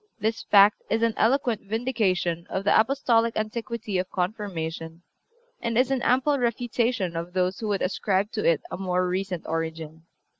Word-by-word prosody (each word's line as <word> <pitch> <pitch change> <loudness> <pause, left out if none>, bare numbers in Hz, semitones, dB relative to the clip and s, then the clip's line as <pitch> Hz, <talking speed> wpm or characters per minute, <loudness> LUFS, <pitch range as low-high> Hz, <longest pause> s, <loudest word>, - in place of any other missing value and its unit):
This 225 +1 -1
fact 205 0 +5
is 225 +1 +1
an 230 -1 +2
eloquent 240 -2 +1
vindication 200 -7 -1
of 190 - -2
the 205 - +3
Apostolic 230 -2 +2
antiquity 215 -2 -3
of 185 - -3
Confirmation, 175 -4 -4 0.6
and 230 -1 -2
is 255 +2 +3
an 265 -2 0
ample 265 +4 +2
refutation 235 -5 0
of 170 +2 -5
those 185 0 0
who 220 - -3
would 200 -2 0
ascribe 195 +2 0
to 215 - -3
it 165 -3 +2
a - - -4
more 180 -1 0
recent 185 -1 -3
origin. 160 0 -5
205 Hz, 160 wpm, -25 LUFS, 180-230 Hz, 0.6 s, fact